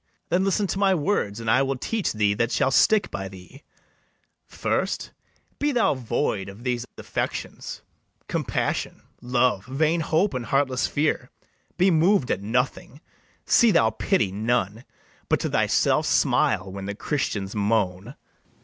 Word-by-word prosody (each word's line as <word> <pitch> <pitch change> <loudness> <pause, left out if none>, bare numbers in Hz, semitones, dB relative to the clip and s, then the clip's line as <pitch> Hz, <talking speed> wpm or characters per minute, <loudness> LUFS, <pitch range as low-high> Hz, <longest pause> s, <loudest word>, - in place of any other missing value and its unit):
then 180 +2 +2
listen 195 +1 +1
to 195 - -3
my 195 -1 +3
words, 145 - -1
And 115 - -7
I 125 +4 +4
will 135 0 0
teach 215 - -2
[thee] 105 -2 +2
that 115 +3 -1
shall 135 -1 +1
stick 215 +9 +3
by 95 -1 -4
thee: 95 +8 -13 0.9
First, - - -2 0.5
be 295 0 +1
thou 230 - +2
void 115 -6 -2
of 100 +4 -12
these 125 -1 -2
affections, - - -5 0.4
Compassion, - - -2 0.2
love, 125 -4 +1
vain 155 +5 +1
hope, 165 +4 +1
and 125 -2 -4
heartless 135 -2 +1
fear; 150 +1 -1 0.5
Be 185 +2 +4
mov'd 165 -2 +3
at 95 - -1
nothing, 125 +5 -2 0.5
see 235 - +5
thou 115 - +4
pity 110 - 0
none, 110 +1 -1 0.4
But - - +2
to - - -2
thyself - - +2
smile 95 +1 +2
when 95 0 -6
the 100 +1 -4
Christians 105 -6 -2
moan. 100 -3 0
125 Hz, 145 wpm, -24 LUFS, 105-160 Hz, 0.9 s, see